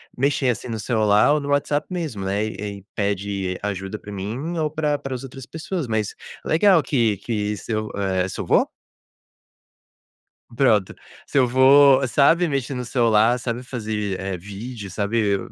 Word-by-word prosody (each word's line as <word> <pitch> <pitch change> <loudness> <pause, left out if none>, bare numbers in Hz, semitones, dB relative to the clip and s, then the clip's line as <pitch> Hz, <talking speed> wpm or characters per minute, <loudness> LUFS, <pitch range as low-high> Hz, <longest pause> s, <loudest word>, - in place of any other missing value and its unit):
mexer, 135 0 +1
assim, 120 - -2
no 115 -2 -4
celular 105 +3 +3
ou 150 - +2
no 140 -1 -5
WhatsApp 145 +1 0
mesmo, 160 - -4
né, 100 +3 0
e 110 - -6 0.2
e 95 - -21
pede 100 -2 -2
ajuda 95 0 -3
para 105 - -11
mim 115 - -4
ou 155 -1 0
pra 150 -1 0
para 135 -1 -5
as 125 - -7
outras 135 -1 -9
pessoas, 160 -1 -4
mas 110 -2 -1 0.3
legal 170 0 +4
que 115 -7 +1
que 105 0 -2
seu, 110 +1 -3
eh, 95 -2 0
seu - - -5
vô? - - +3 1.9
Pronto, 110 -7 +3 0.3
seu 130 -3 +2
vô, 135 +2 +6
sabe 165 +7 +4
mexer 140 -2 -2
no 125 0 -4
celular, 115 -1 +3
sabe 120 0 -4
fazer, 105 -6 -3
eh, 95 -1 -3
vídeo, 100 +3 -8
sabe, 100 0 0
115 Hz, 160 wpm, -22 LUFS, 105-140 Hz, 1.9 s, vô